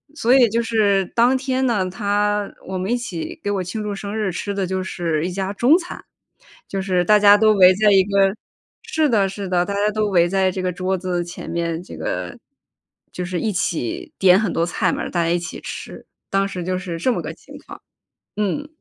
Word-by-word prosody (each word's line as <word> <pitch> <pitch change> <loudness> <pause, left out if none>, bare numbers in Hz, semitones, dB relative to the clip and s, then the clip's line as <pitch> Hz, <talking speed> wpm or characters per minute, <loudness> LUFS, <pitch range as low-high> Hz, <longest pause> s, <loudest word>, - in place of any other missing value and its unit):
所 245 -3 +2
以 250 -4 +6
就 235 +2 0
是 205 -4 +2
当 245 +3 +4
天 260 0 -1
呢， 205 -6 +1
他 205 +1 -1 0.2
我 190 0 -3
们 190 +4 -2
一 245 - +2
起 185 -9 -6
给 205 - -1
我 195 -2 -1
庆 210 +5 -5
祝 205 -1 -3
生 200 +2 -5
日 210 -4 -1
吃 200 +3 -4
的 195 -2 -1
就 190 0 -2
是 165 -3 -2
一 - - -4
家 195 +1 -3
中 260 - +4
餐。 355 -1 -8 0.6
就 195 -1 -3
是 180 -2 0
大 210 0 +5
家 205 0 +7
都 215 0 +4
围 185 -2 +6
在 210 +1 +4
一 195 -1 +6
个 195 0 +2 0.5
是 315 -1 0
的 200 -4 +2
是 195 0 -6
的， 180 -1 +1
大 200 - -3
家 205 +1 +1
都 215 0 0
围 175 -4 +3
在 190 0 +1
这 185 0 -4
个 185 - 0
桌 185 +1 -1
子 180 -1 -2
前 175 0 -9
面， 170 0 -2
这 - - -10
个 - - -4 0.7
就 180 - -5
是 180 0 -3
一 220 - -1
起 170 - -3
点 185 0 +6
很 210 -5 -1
多 165 - +1
菜 175 - 0
嘛， - - -3
大 170 -2 0
家 165 - 0
一 175 - +2
起 175 - -7
吃。 - - -8 0.2
当 195 0 +2
时 185 -3 -5
就 185 +1 -2
是 180 -3 -5
这 250 +10 +1
么 - - -3
个 - - -5
情 - - -15
况， - - -10 0.6
嗯。 210 +9 -1
195 Hz, 245 characters per minute, -21 LUFS, 180-210 Hz, 0.7 s, 家